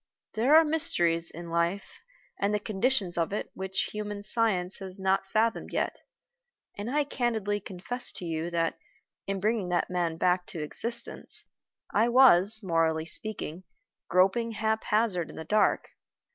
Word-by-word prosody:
There 250 +7 +4
are 325 0 +7
mysteries 175 - +2
in 170 +1 -9
life 170 +4 -1 0.4
and 200 +1 +1
the - - 0
conditions 205 -3 0
of 165 - 0
it 210 - -4
which 190 0 -2
human 210 -1 -5
science 205 -4 0
has 190 -1 -7
not 190 0 0
fathomed 225 +3 0
yet; - - -1 0.8
and 205 +3 -5
I 295 +3 +1
candidly 225 -7 -1
confess 205 +6 -3
to 180 - -6
you 165 0 -3
that, 165 -1 -1 0.5
in 195 0 -2
bringing 210 -2 0
that 175 0 0
man 170 -2 -1
back 180 +1 +1
to 160 - -5
existence, 235 +9 -5 0.5
I 225 +3 +3
was, 220 -4 +7
morally 165 -3 +1
speaking, 185 -2 -6 0.5
groping 195 +6 +2
haphazard 215 -4 0
in - - -11
the 160 - -7
dark. 210 +5 +2
195 Hz, 145 wpm, -28 LUFS, 175-225 Hz, 0.8 s, are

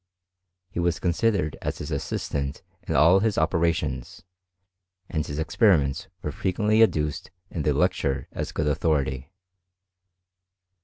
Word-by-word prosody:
He - - -4
was 85 -1 +1
considered 90 -4 +1
as - - -3
his 75 - -6
assist 70 - -3
ant 70 -1 -2 0.2
in - - -1
all 85 +5 +6
his 110 0 0
operations, 80 -5 0 0.8
and 80 -4 -1
his 70 - -6
experiments 80 - +2 0.2
were - - -2
fre - - -4
quently 105 +4 +2
adduced 75 -9 +1 0.2
in 85 - -3
the 75 - +2
lecture 70 -5 0
as - - -4
good 75 - -1
authority. 70 -2 0
80 Hz, 135 wpm, -25 LUFS, 70-90 Hz, 0.8 s, all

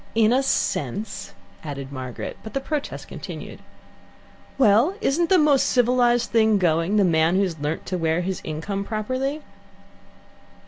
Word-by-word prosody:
"In 225 0 +4
a 260 - +3
sense," 200 - -2 0.3
added 140 -3 -6
Margaret, 130 -3 -6
but 220 - -10
the - - +2
protest 290 +1 -4
continued. - - -8 1.0
"Well, 250 - +4
isn't 340 -3 +1
the 380 - +6
most 300 -4 +4
civilized 245 -1 +2
thing 220 -2 +4
going, 170 +1 +1
the 205 - +4
man 165 -1 +3
who 195 - +3
has 170 -5 -3
learnt 150 +2 -3
to 185 -1 -3
wear 165 +1 +1
his 185 0 -3
income 180 +6 -4
properly?" 255 +8 -3
210 Hz, 145 wpm, -23 LUFS, 165-255 Hz, 1.0 s, the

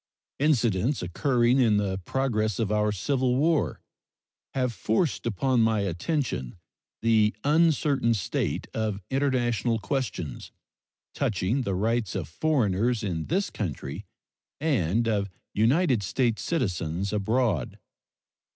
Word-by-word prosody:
Incidents 125 - +2
occurring 120 +7 +2
in 110 -5 +4
the 95 -2 -1
progress 110 -6 0
of 110 -3 -1
our 105 0 +2
civil 125 +5 0
war 145 - +1 0.7
have 125 -2 0
forced 115 - 0
upon 125 +3 +1
my 110 -2 +2
attention 95 - -2 0.5
the 110 -2 +3
uncertain 145 -5 +3
state 100 - -2
of 110 -3 -1
international 125 -4 +1
questions 110 - -4 0.6
touching 110 +6 0
the 100 -6 -1
rights 110 +1 0
of 90 -7 -3
foreigners 115 - +1
in 85 -6 -2
this 195 +4 -1
country 85 - -5 0.6
and 115 - +1
of 100 -3 0 0.2
United 125 - +3
States 115 +3 0
citizens 95 - -1
abroad. 105 - 0
115 Hz, 110 wpm, -27 LUFS, 100-130 Hz, 0.7 s, in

